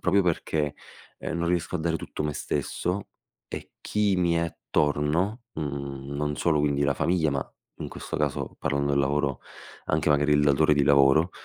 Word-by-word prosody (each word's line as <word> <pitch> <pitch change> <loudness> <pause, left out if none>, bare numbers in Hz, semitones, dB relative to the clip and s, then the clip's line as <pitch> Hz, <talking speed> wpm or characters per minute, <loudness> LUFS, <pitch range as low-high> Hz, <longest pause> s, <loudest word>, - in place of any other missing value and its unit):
Proprio 100 +3 +3
perché, 80 -4 0 0.4
ehm, 85 - -3
non 85 0 0
riesco 90 +1 0
a - - -6
dare 80 0 0
tutto - - -5
me 75 - -1
stesso, 90 +3 -2 0.4
e - - -7
chi 105 -2 +1
mi 85 -2 +2
è 85 - +2
attorno, 80 - 0
mhmm, 70 -1 -5
non 75 0 -1
solo 75 -3 +2
quindi 70 -1 +1
la 70 - +2
famiglia, 80 0 +1
ma 70 0 0 0.4
in - - -5
questo - - -6
caso - - -2
parlando 70 0 0
del 70 - +3
lavoro, 70 -1 0 0.5
anche 75 0 +1
magari 75 +1 +3
il 75 0 +4
datore 75 +2 +4
di 70 -1 +3
lavoro, 70 +5 +5
75 Hz, 180 wpm, -26 LUFS, 70-85 Hz, 0.5 s, lavoro